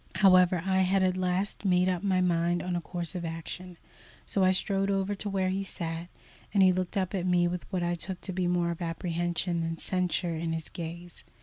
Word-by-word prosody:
However, 185 -2 +5
I 190 0 +2
had 190 +1 +3
at 185 -1 +2
last 185 +3 -1
made 180 -2 +3
up 180 -2 0
my 190 -2 +2
mind 175 -1 +1
on 180 -1 -2
a 175 - -1
course 175 0 -5
of 180 -2 -4
action, 170 +2 -6 0.5
so 195 - +1
I 185 - +5
strode 195 +1 +1
over 195 0 0
to 205 +1 -4
where 190 -1 0
he 190 +1 -1
sat, 170 -3 -5 0.5
and 195 - +6
he 185 - +7
looked 185 +1 -2
up 185 0 0
at 185 -2 -1
me 175 -1 +3
with 180 +2 -5
what 180 -2 0
I 175 0 +1
took 180 +1 -5
to 190 - -5
be 180 0 0
more 175 -1 +1
of 170 - -6
apprehension 170 +1 -1
than 165 0 -2
censure 180 -1 0
in 165 0 -2
his 160 -1 -4
gaze. 170 +1 -7
180 Hz, 220 wpm, -29 LUFS, 170-190 Hz, 0.5 s, he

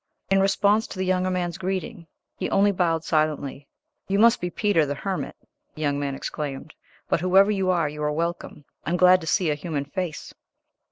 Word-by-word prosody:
In 195 - +5
response 200 +2 +2
to - - -9
the 190 - -1
younger 185 0 +1
man's 180 -1 -2
greeting 190 0 -4 0.3
he - - -3
only 200 +1 +3
bowed 170 -4 0
silently. 150 -3 -1 0.4
"You 195 - 0
must 230 +3 +5
be 180 - -2
Peter, 200 -3 +2
the 145 -1 -2
hermit," 190 +6 -4 0.4
the 155 - -8
young 145 -1 0
man 140 -1 -2
exclaimed; 145 +1 -5 0.3
"but - - 0
whoever 190 +3 +5
you 190 -2 0
are, 170 -4 +2
you 150 +1 -7
are 150 0 0
welcome; 165 -2 -4 0.2
I - - -4
am 175 - +1
glad 185 0 +6
to 160 - -8
see 170 -2 +2
a - - +2
human 145 -1 -4
face." 175 +1 -5
175 Hz, 200 wpm, -24 LUFS, 150-190 Hz, 0.4 s, glad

